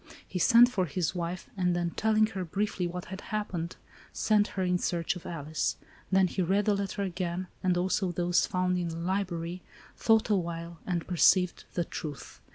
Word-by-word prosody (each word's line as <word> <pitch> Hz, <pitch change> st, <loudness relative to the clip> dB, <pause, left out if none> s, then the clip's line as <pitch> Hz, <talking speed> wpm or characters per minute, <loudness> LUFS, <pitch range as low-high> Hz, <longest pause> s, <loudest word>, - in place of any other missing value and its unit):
He 180 Hz, -, -3 dB
sent 235 Hz, +7 st, +7 dB
for 195 Hz, -8 st, -1 dB
his 170 Hz, +3 st, -1 dB
wife, 175 Hz, 0 st, -4 dB
and, 180 Hz, -2 st, +1 dB
then, 175 Hz, -1 st, -1 dB
telling 215 Hz, +2 st, +3 dB
her 190 Hz, -1 st, -2 dB
briefly 190 Hz, +1 st, -1 dB
what 180 Hz, +1 st, -5 dB
had 190 Hz, -, -6 dB
happened, 185 Hz, -6 st, -3 dB, 0.4 s
sent 210 Hz, -1 st, +2 dB
her 190 Hz, -, +1 dB
in 180 Hz, 0 st, +1 dB
search 170 Hz, 0 st, -1 dB
of 180 Hz, -, -8 dB
Alice. 155 Hz, -2 st, -2 dB, 0.3 s
Then 190 Hz, 0 st, +5 dB
he 185 Hz, +1 st, -1 dB
read 195 Hz, +3 st, +2 dB
the 210 Hz, -, +3 dB
letter 200 Hz, 0 st, -2 dB
again, 180 Hz, -1 st, -2 dB, 0.2 s
and 185 Hz, -2 st, +2 dB
also 185 Hz, +1 st, +1 dB
those 175 Hz, 0 st, +2 dB
found 180 Hz, 0 st, 0 dB
in 175 Hz, -, -1 dB
the 165 Hz, 0 st, -5 dB
library, 175 Hz, -1 st, -2 dB, 0.3 s
thought 225 Hz, -1 st, +3 dB
a -, -, +5 dB
while, 170 Hz, -2 st, -4 dB
— -, -, -24 dB
and 175 Hz, -3 st, -1 dB
perceived 180 Hz, 0 st, +3 dB
the 175 Hz, -, 0 dB
truth. 150 Hz, -3 st, -7 dB
180 Hz, 190 wpm, -29 LUFS, 170-195 Hz, 0.4 s, sent